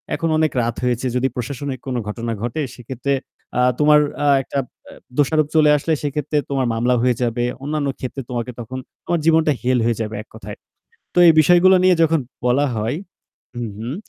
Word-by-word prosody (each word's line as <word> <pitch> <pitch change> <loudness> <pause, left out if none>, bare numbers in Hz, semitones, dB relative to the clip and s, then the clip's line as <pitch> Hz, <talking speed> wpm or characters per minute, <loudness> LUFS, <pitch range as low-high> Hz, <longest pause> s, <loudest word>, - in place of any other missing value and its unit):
এখন 165 - -1
অনেক 155 -1 +2
রাত 115 0 -2
হয়েছে। 125 +1 0
যদি 130 +1 +2
প্রশাসনিক 130 +1 -4
কোনো 125 -2 -1
ঘটনা 115 +2 -4
ঘটে 120 +6 -2
সেক্ষেত্রে 130 +2 -3 0.5
আ - - +4 0.2
তোমার 150 0 +6 0.3
আ - - +3 0.2
একটা 140 - -5 0.3
আ - - -12 0.3
দোষারোপ 150 +1 +2
চলে 150 -1 +5
আসলে 160 +3 -1
সেক্ষেত্রে 150 +1 -2
তোমার 135 -3 0
মামলা 120 +2 +1
হয়ে 125 -1 +2
যাবে। 120 0 0 0.2
অন্যান্য 150 -1 -2
ক্ষেত্রে 130 +1 -5
তোমাকে 120 0 -3
তখন, 125 +3 -6 0.3
তোমার 170 -1 0
জীবনটা 160 -2 +4
হেল 125 0 +1
হয়ে 115 -2 +1
যাবে 110 0 -4
এককথায়।" - - -11 0.6
তো - - -7
এই 165 - +8
বিষয়গুলা 180 +3 +6
নিয়ে 185 -1 +5
যখন 160 -1 +2 0.3
বলা 140 +4 +3
হয় 115 +8 -1 0.6
হুম, 120 -3 -4
হুম। 120 +6 -4
135 Hz, 180 wpm, -20 LUFS, 120-150 Hz, 0.6 s, এই